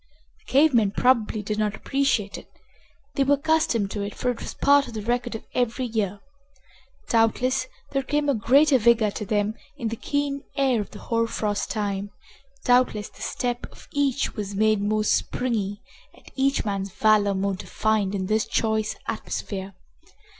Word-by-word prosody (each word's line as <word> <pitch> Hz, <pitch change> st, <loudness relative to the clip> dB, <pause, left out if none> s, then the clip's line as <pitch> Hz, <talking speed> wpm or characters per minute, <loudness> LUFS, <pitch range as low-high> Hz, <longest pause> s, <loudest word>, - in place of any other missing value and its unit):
The -, -, -31 dB
cave 290 Hz, +2 st, +5 dB
men, 220 Hz, -4 st, +4 dB
probably, 220 Hz, -1 st, +2 dB
did 210 Hz, +1 st, -2 dB
not 210 Hz, -1 st, 0 dB
appreciate 270 Hz, -7 st, 0 dB
it. -, -, -9 dB, 0.7 s
They 275 Hz, -, +2 dB
were 285 Hz, +1 st, +4 dB
accustomed 280 Hz, -9 st, +1 dB
to 205 Hz, -, -3 dB
it, 200 Hz, +1 st, -4 dB
for 250 Hz, -, 0 dB
it 240 Hz, -, -7 dB
was -, -, -6 dB
part 285 Hz, 0 st, +4 dB
of 230 Hz, -, -9 dB
the 215 Hz, -, -4 dB
record 240 Hz, +1 st, -1 dB
of 225 Hz, -, -6 dB
every 245 Hz, +1 st, 0 dB
year. 205 Hz, -4 st, -2 dB, 0.9 s
Doubtless 250 Hz, +3 st, +2 dB, 0.2 s
there 275 Hz, -, +1 dB
came 290 Hz, +2 st, -1 dB
a 280 Hz, -, +3 dB
greater 270 Hz, +5 st, +4 dB
vigor 225 Hz, -2 st, +4 dB
to 210 Hz, 0 st, -5 dB
them 205 Hz, +1 st, +1 dB, 0.2 s
in 235 Hz, -5 st, -2 dB
the 225 Hz, -, -3 dB
keen 285 Hz, +3 st, -2 dB
air 265 Hz, -5 st, +2 dB
of 200 Hz, -, -7 dB
the -, -, -11 dB
hoar 230 Hz, 0 st, 0 dB
frost 210 Hz, -2 st, -2 dB
time, 205 Hz, -2 st, -2 dB, 0.5 s
doubtless 245 Hz, -4 st, +2 dB
the -, -, -17 dB
step 245 Hz, -1 st, -2 dB
of -, -, -16 dB
each 285 Hz, -1 st, 0 dB
was 205 Hz, -3 st, -4 dB
made 215 Hz, 0 st, +3 dB
more 215 Hz, +1 st, +1 dB
springy 215 Hz, -2 st, -1 dB, 0.3 s
and -, -, -21 dB
each 275 Hz, -1 st, +1 dB
man's 195 Hz, -1 st, -2 dB
valor 210 Hz, -1 st, +3 dB
more 195 Hz, +1 st, 0 dB
defined 205 Hz, +1 st, -1 dB
in 190 Hz, -1 st, -2 dB
this 215 Hz, +2 st, +1 dB
choice 220 Hz, -1 st, 0 dB
atmosphere. 195 Hz, -1 st, -4 dB
225 Hz, 175 wpm, -25 LUFS, 205-255 Hz, 0.9 s, cave